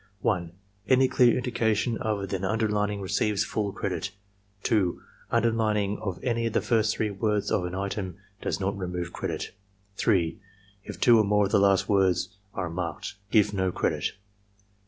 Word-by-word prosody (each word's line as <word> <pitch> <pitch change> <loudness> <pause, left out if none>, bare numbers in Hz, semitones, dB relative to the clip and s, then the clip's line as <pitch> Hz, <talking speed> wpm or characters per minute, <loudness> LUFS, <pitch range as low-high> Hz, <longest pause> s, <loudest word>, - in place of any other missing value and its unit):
1. 85 -5 0 0.4
Any 130 0 +5
dear 125 -2 +4
indication 115 -2 0
other 105 -3 -1
than 95 0 -3
underlining 105 -1 0
receives 100 +2 +1
full 105 -2 -2
credit. 95 -1 -3 0.5
2. 100 -6 +1 0.3
Underlining 110 -3 +1
of 95 -4 -3
any 115 -2 0
of 115 - -4
the - - +3
first 110 -2 +2
three 110 -2 -1
words 105 +1 0
of 90 - +1
an 90 +1 -4
item 95 -1 -3 0.2
does - - -2
not 100 +1 -1
remove 90 -2 -4
credit. - - -4 0.5
3. 90 -7 +1 0.4
If - - -8
two 120 -2 +6
or - - +5
more 105 0 +3
of 100 - -3
the - - +5
last 100 -1 +4
four 100 - +2
words 95 -1 +2 0.3
are 90 - -2
marked, 85 -3 -4 0.2
give 105 -2 +3
no 95 -2 +1
credit. - - -1
100 Hz, 165 wpm, -27 LUFS, 95-110 Hz, 0.5 s, two